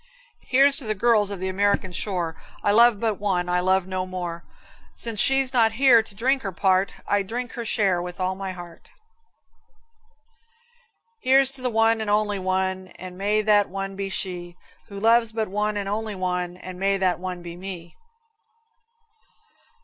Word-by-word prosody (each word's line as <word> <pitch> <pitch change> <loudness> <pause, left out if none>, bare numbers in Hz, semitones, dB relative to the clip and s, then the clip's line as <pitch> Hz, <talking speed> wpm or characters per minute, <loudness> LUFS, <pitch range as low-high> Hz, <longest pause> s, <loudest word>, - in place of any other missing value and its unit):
Here's 275 +2 +5
to - - +1
the 215 0 -1
girls 215 -1 +2
of 200 -2 -5
the 190 - -3
American 190 0 0
shore; 175 -3 -2 0.3
I 205 - +3
love 230 0 +5
but 220 -3 -1
one, 185 -3 -1
I 180 0 +1
love 185 0 +2
no 185 0 -3
mare. 175 -2 -5 0.5
Since 230 -3 -2
she's 270 +1 +3
not 225 -3 +3
here 245 -1 +6
to 215 -2 -11
drink 265 +6 +1
her 195 - -4
part, 190 +1 +1
I 205 - +2
drink 235 +5 -5
her 235 - -5
share 200 -6 +1
with 180 +1 -7
all 185 0 0
my 190 0 -5
heart. 175 -2 -11 2.3
Here's 265 +1 +5
to 255 -2 0
one 225 0 +2
and 215 - -3
only 210 -1 +1
one, 190 0 -1
And 185 0 -9
may 205 +3 0
that 205 -1 +3
one 195 0 -5
be 195 0 -4
she 175 -2 -4 0.3
Who 200 -1 -8
loves 230 +1 +3
but 220 -2 -2
one 210 +1 -1
and 200 -1 -3
only 215 +1 -3
one, 180 -1 -3
And 185 0 -9
may 195 +1 +1
that 185 -2 0
one 180 -1 -6
be 170 -1 -8
me. 180 -2 -8
195 Hz, 170 wpm, -24 LUFS, 185-220 Hz, 2.3 s, here